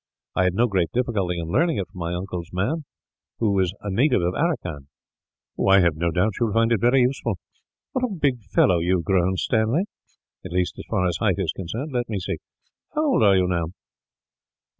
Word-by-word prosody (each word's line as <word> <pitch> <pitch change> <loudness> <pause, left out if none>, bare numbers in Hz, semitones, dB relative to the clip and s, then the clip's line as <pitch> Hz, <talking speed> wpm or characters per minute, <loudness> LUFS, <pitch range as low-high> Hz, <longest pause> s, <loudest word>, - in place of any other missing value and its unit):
I 95 - +3
had 90 -1 +1
no 120 +4 +4
great 95 -8 0
difficulty 105 -8 0
in 85 -1 -4
learning 165 - +2
it 95 - -2
from 90 - -11
my 85 +1 -2
uncle's 90 -1 -5
man, 130 - -1 0.5
who 110 -3 +1
was 95 -3 +2
a 105 - -4
native 125 +8 +3
of 90 +1 0
Aracan." 90 - -2 0.8
"I 100 0 +7
have 85 -3 +3
no 85 +2 0
doubt 90 +6 +1
you 120 - +2
will 105 - -3
find 115 0 +3
it 115 -4 +2
very 125 +2 +4
useful. 125 -5 0 0.5
What 255 -1 0
a - - -3
big 140 -7 0
fellow 90 -2 +3
you 90 +3 +2
have 85 - -4
grown, 95 -1 +2
Stanley; 110 - +1 0.6
at 95 - -8
least, 90 0 +1
as - - -7
far 100 -4 +1
as 90 - -1
height 100 -5 +2
is 95 -5 0
concerned. 115 - -5
Let 120 -2 -2
me 105 - -2
see. 90 - -3 0.6
How 305 +1 +1
old - - +3
are 100 -3 +6
you, 90 - +3
now?" 85 -2 0
95 Hz, 210 wpm, -24 LUFS, 90-120 Hz, 0.8 s, I